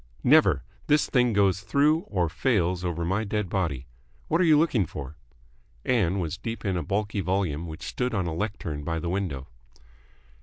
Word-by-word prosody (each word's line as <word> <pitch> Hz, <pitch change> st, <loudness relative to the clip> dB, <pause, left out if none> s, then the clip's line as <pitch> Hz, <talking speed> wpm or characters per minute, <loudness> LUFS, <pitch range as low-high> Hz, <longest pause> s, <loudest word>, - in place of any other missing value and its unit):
"Never. -, -, +5 dB, 0.2 s
This 150 Hz, 0 st, +3 dB
thing 125 Hz, -2 st, +3 dB
goes 100 Hz, -2 st, +2 dB
through, 145 Hz, +8 st, +3 dB
or 90 Hz, -4 st, 0 dB
fails 90 Hz, -, 0 dB
over 85 Hz, -1 st, -2 dB
my 95 Hz, +5 st, 0 dB
dead 105 Hz, -2 st, -2 dB
body. 80 Hz, -10 st, -1 dB, 0.4 s
What 165 Hz, +3 st, +2 dB
are -, -, +4 dB
you 155 Hz, -2 st, +6 dB
looking 135 Hz, -, +2 dB
for?" 70 Hz, 0 st, -7 dB, 0.7 s
Ann 100 Hz, -7 st, +2 dB
was 90 Hz, +1 st, -3 dB
deep 115 Hz, +2 st, -5 dB
in 95 Hz, -2 st, 0 dB
a 90 Hz, -, -1 dB
bulky 100 Hz, +2 st, -1 dB
volume 90 Hz, -3 st, -1 dB
which 80 Hz, -1 st, -8 dB
stood 125 Hz, -2 st, -2 dB
on 95 Hz, -3 st, 0 dB
a 85 Hz, -, -2 dB
lectern 85 Hz, -6 st, -4 dB
by 80 Hz, +2 st, -2 dB
the 85 Hz, +1 st, -3 dB
window. 85 Hz, -8 st, -3 dB
95 Hz, 180 wpm, -26 LUFS, 85-110 Hz, 0.7 s, you